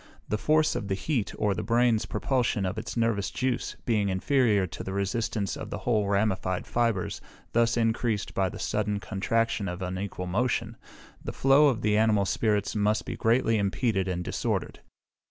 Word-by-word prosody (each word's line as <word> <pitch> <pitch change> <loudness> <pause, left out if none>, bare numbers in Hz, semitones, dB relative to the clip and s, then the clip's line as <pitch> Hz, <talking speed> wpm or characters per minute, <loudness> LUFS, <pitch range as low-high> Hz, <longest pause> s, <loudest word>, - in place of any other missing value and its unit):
The 105 - 0
force 155 +3 +2
of 100 - -3
the 95 - 0
heat, 120 0 -1
or 105 -2 +1
the - - -3
brain's 115 -1 +2
propulsion 115 -3 0
of 95 +3 -2
its 115 - -6
nervous 110 -4 +1
juice, 130 -1 -2
being 105 -4 +1
inferior 105 +1 +2
to 85 - -7
the 95 - -5
resistance 100 +1 -1
of - - -7
the - - -4
whole 110 -4 0
ramified 100 -3 0
fibres 115 -6 -1 0.3
thus 115 0 +3
encreased 115 -2 0
by 95 -1 +1
the - - -8
sudden 105 -1 -1
contraction 105 +2 -1
and 90 +1 -5
unequal 95 0 -4
motion, 115 +4 -1 0.5
the - - -4
flow 135 +3 +5
of 125 -5 0
the 105 0 +3
animal 110 -2 +3
spirits 105 +2 0
must 105 +1 +1
be - - -4
greatly 115 -1 +2
impeded 100 -1 0
and 90 -1 -2
disordered. - - -2
105 Hz, 170 wpm, -27 LUFS, 100-115 Hz, 0.5 s, flow